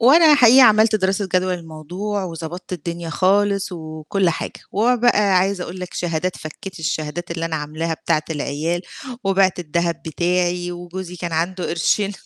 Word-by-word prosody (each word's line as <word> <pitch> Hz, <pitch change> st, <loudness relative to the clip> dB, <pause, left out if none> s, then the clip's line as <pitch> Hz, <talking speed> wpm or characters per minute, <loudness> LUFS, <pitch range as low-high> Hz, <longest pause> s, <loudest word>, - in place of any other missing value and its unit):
وأنا 305 Hz, +6 st, +7 dB
حقيقي 255 Hz, -1 st, +7 dB
عملت 220 Hz, -2 st, +6 dB
دراسة 190 Hz, 0 st, 0 dB
جدوى 185 Hz, 0 st, +2 dB
للموضوع، 175 Hz, +5 st, -5 dB
وضبطت 170 Hz, +1 st, -7 dB
الدنيا 170 Hz, 0 st, -5 dB
خالص 195 Hz, +2 st, +2 dB
وكل 160 Hz, +3 st, -2 dB
حاجة، 160 Hz, -, -5 dB
وهو 235 Hz, +5 st, +3 dB
بقى 210 Hz, -5 st, +3 dB
عايزة 190 Hz, 0 st, 0 dB
أقول 185 Hz, +1 st, -8 dB
لك 180 Hz, -, -7 dB
شهادات، 175 Hz, +1 st, -2 dB
فكّيت 175 Hz, +4 st, -9 dB
الشهادات 160 Hz, +2 st, -3 dB
اللي 165 Hz, -1 st, -3 dB
أنا 165 Hz, -1 st, -2 dB
عاملاها 155 Hz, +2 st, -3 dB
بتاعة 155 Hz, -1 st, 0 dB
العيال، 160 Hz, +3 st, -2 dB, 0.4 s
وبِعت 195 Hz, -1 st, +2 dB
الدهب 170 Hz, 0 st, -1 dB
بتاعي، 175 Hz, +2 st, 0 dB
وجوزي 175 Hz, +1 st, -7 dB
كان 175 Hz, 0 st, -5 dB
عنده 175 Hz, +3 st, -1 dB
قرشين 195 Hz, +5 st, +1 dB
180 Hz, 150 wpm, -21 LUFS, 165-195 Hz, 0.4 s, وأنا